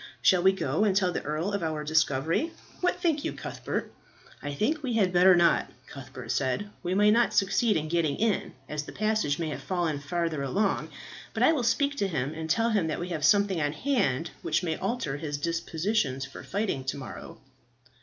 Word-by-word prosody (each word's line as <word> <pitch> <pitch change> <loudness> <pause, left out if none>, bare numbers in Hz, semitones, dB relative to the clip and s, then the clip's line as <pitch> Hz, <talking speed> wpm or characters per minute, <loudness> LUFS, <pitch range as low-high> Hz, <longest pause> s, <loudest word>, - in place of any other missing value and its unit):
Shall 185 -2 +4
we 190 +1 +6
go 195 +2 0
and 200 -3 +2
tell 185 -3 +3
the - - -3
earl 155 +6 -2
of 200 - -1
our 155 -2 -2
discovery? 155 - +1 0.3
What 360 - 0
think 315 -4 +1
you, - - -2
Cuthbert?" - - -5 0.5
"I 145 - -4
think 275 - 0
we 260 -4 -2
had 195 -5 +2
better 180 +1 +7
not," 175 -1 +3 0.2
Cuthbert 130 -4 -8
said. 135 +13 -1
"We 180 0 -1
might 210 +1 +5
not 235 +2 +3
succeed 205 +1 +3
in 155 0 -2
getting 160 -3 +1
in, 220 -2 0
as 150 -1 -3
the 150 - -10
passage 215 -9 0
may 165 -2 -2
have 140 -2 -5
fallen 170 -2 -1
farther 165 0 -2
along; 195 +10 0 0.5
but - - +1
I 320 - +6
will 295 - 0
speak 280 +4 +1
to 200 - +1
him 150 -5 -2
and 160 0 -6
tell 230 +7 +2
him 200 -7 +1
that 155 - -2
we 175 +1 -4
have 160 -4 -3
something 195 +1 +4
on 145 0 0
hand 165 - 0
which - - 0
may 160 -2 -1
alter 165 - -2
his 145 -1 -4
dispositions 165 -2 -1
for 135 - -10
fighting 200 -9 -2
to 130 - -2
morrow." 130 -7 -9
170 Hz, 205 wpm, -28 LUFS, 150-210 Hz, 0.5 s, better